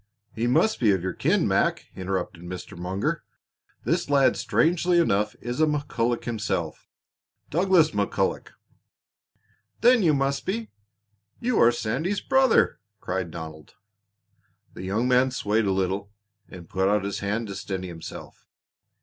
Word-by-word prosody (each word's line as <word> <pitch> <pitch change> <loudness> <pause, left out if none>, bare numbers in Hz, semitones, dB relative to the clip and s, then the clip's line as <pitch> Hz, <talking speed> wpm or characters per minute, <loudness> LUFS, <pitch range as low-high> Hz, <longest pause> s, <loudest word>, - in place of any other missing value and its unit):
"He 115 +2 -1
must 215 - +2
be 115 - +3
of 95 -2 -1
your 95 - -2
kin, - - +1
Mac!" - - +1
interrupted 95 -2 -3
Mr. 90 0 -8
Munger. 90 +3 -2 0.6
"This - - 0
lad, 140 -2 +4
strangely 175 +2 +2
enough, 105 -10 +2
is 120 +5 -3
a 155 - +5
McCulloch 125 -5 -1
himself 105 -8 -3 0.6
Douglas 175 -1 +4
McCulloch." 100 -4 -1 1.3
"Then 245 -1 +6
you 160 -5 +4
must 135 0 0
be 220 +3 -3 0.7
you 240 -1 +1
are 115 - +7
Sandy's 135 - -2
brother!" 265 -2 +3 0.2
cried 95 -3 -3
Donald. 80 -2 -9 1.0
The - - -9
young 105 +6 0
man 125 +1 +4
swayed 110 -3 0
a 100 - +1
little 95 +1 -1 0.4
and 85 -3 -11
put 95 +3 +1
out 105 -1 +2
his 100 0 -3
hand 105 +4 -2
to - - -4
steady 95 -1 -4
himself. 80 -2 -10
115 Hz, 140 wpm, -25 LUFS, 95-150 Hz, 1.3 s, are